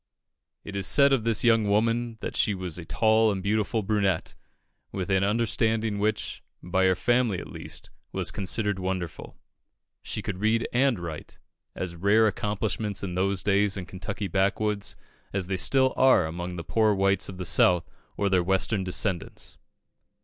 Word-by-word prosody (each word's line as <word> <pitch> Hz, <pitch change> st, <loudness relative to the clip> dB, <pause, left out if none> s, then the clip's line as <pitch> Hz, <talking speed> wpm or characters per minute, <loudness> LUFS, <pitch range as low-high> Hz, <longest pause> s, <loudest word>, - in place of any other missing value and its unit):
It 100 Hz, -, -8 dB
is 100 Hz, -1 st, 0 dB
said 140 Hz, +5 st, +5 dB
of 120 Hz, -5 st, +1 dB
this 115 Hz, -2 st, +1 dB
young 115 Hz, -3 st, +4 dB
woman 115 Hz, +2 st, +1 dB
that -, -, -5 dB
she 105 Hz, -, +2 dB
was 90 Hz, -2 st, -5 dB
a 85 Hz, -, -8 dB
tall 110 Hz, +3 st, +3 dB
and 95 Hz, -2 st, -4 dB
beautiful 105 Hz, +2 st, 0 dB
brunette, 95 Hz, -4 st, 0 dB, 0.6 s
with 95 Hz, -1 st, -3 dB
an 95 Hz, 0 st, +3 dB
understanding 110 Hz, 0 st, 0 dB
which, 105 Hz, +1 st, -1 dB, 0.2 s
by 95 Hz, +2 st, +1 dB
her 95 Hz, 0 st, +4 dB
family 120 Hz, +1 st, +1 dB
at -, -, -6 dB
least, -, -, -7 dB, 0.2 s
was -, -, -1 dB
considered 105 Hz, +1 st, -1 dB
wonderful. 90 Hz, -3 st, -5 dB, 0.6 s
She -, -, -5 dB
could 95 Hz, -2 st, -4 dB
read 110 Hz, +2 st, +1 dB
and 130 Hz, -1 st, +3 dB
write 85 Hz, -3 st, -8 dB, 0.4 s
as 85 Hz, -2 st, -4 dB
rare 100 Hz, +5 st, +3 dB
accomplishments 105 Hz, -2 st, -2 dB
in 90 Hz, -2 st, -3 dB
those 95 Hz, +1 st, 0 dB
days 100 Hz, 0 st, +2 dB
in 95 Hz, -, -5 dB
Kentucky 100 Hz, +2 st, -5 dB
backwoods 100 Hz, +2 st, 0 dB, 0.4 s
as 100 Hz, -2 st, -1 dB
they 95 Hz, +1 st, -2 dB
still 130 Hz, +6 st, +2 dB
are 130 Hz, -9 st, +5 dB
among 85 Hz, +2 st, -5 dB
the 85 Hz, -, -5 dB
poor 110 Hz, +3 st, +2 dB
whites 100 Hz, 0 st, +1 dB
of 95 Hz, -, -8 dB
the 90 Hz, -, -5 dB
South 90 Hz, +1 st, +4 dB, 0.3 s
or 100 Hz, -, +1 dB
their 95 Hz, -2 st, +3 dB
Western 95 Hz, +3 st, +1 dB
descendants. 90 Hz, -1 st, -2 dB
100 Hz, 165 wpm, -26 LUFS, 95-110 Hz, 0.6 s, said